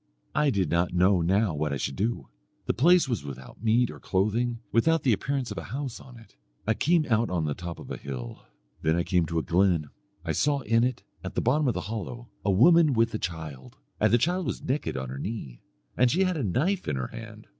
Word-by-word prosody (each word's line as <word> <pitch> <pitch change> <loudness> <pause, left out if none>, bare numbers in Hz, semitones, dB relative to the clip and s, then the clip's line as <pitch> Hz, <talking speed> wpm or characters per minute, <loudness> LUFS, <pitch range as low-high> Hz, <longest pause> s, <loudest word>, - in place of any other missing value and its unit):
I 150 +1 +3
did 95 - 0
not 85 +1 +1
know 90 +1 +4
now 95 +2 +2
what 75 0 -1
I 70 - -1
should 70 +1 -3
do. 115 +4 -2 0.4
The - - +1
place 175 +6 +5
was 120 - -2
without 70 - -10
meat 115 +2 +3
or - - -11
clothing, 115 +5 0
without 160 +7 +3
the 125 - +4
appearance 135 +5 -2
of - - -4
a - - -8
house 135 -2 -5
on 125 -2 -13
it. 115 - -17 0.3
I 110 - +2
came 165 +5 +2
out 115 -1 +2
on 85 -3 -1
the 75 - -1
top 85 +2 -7
of - - -10
a - - -4
hill. 65 -4 -7 0.4
Then 80 +1 +2
I 85 - +1
came 90 -2 +1
to 85 +1 -2
a 80 - +1
glen; 85 -4 +2 0.3
I - - 0
saw 145 -1 +1
in 115 -1 +2
it, 125 -1 -1 0.2
at - - -6
the - - +1
bottom 145 +4 +2
of 125 - +1
a - - -2
hollow, 115 +2 -6
a - - 0
woman 155 - +6
with 115 -1 +2
a 110 - -2
child, 75 -7 -6 0.2
and - - +3
the 120 - +6
child 175 +9 0
was - - -4
naked 135 - -2
on 65 -1 -4
her 65 +2 -6
knee, 70 - -6 0.3
and 125 0 +4
she 180 +9 +2
had 185 -1 +1
a 150 - -2
knife 155 - 0
in - - 0
her 65 -2 -3
hand. - - -10
110 Hz, 240 wpm, -27 LUFS, 85-130 Hz, 0.4 s, woman